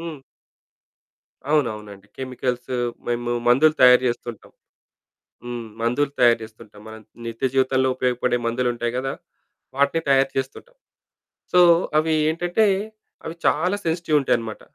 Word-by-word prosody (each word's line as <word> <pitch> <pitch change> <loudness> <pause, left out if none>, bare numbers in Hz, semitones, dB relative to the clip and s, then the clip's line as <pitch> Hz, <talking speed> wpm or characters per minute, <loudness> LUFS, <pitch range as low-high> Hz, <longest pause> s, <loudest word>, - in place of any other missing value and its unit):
హ్మ్. 165 -3 -7 1.3
అవునవునండి. 105 -8 -2
కెమికల్స్ 125 -1 -4 0.4
మేము 120 0 -2 0.2
మందులు 150 +6 +5
తయారు 125 0 +7
చేస్తుంటాం. 120 -2 -6 0.9
హ్మ్. 120 -1 -5 0.2
మందులు 130 +5 0
తయారుచేస్తుంటాం. 110 -3 0
మనం 110 0 -10 0.3
నిత్య 115 +2 -3
జీవితంలో 130 0 +2
ఉపయోగపడే 125 -1 0
మందులు 125 +2 -1
ఉంటాయి 120 0 -3
గదా! 135 +1 -2 0.6
వాటిని 140 +4 +1
తయారు 135 0 +4
చేస్తుంటాం. 135 - -5 0.8
సో, 180 - +4 0.4
అవి 160 +1 +2 0.2
ఏంటంటే 175 +6 +1 0.6
అవి 160 - -6
చాలా 180 +6 +2
సెన్సిటివ్ 160 -2 +1
ఉంటాయన్నమాట. 115 -4 -2
125 Hz, 110 wpm, -22 LUFS, 120-150 Hz, 1.3 s, తయారు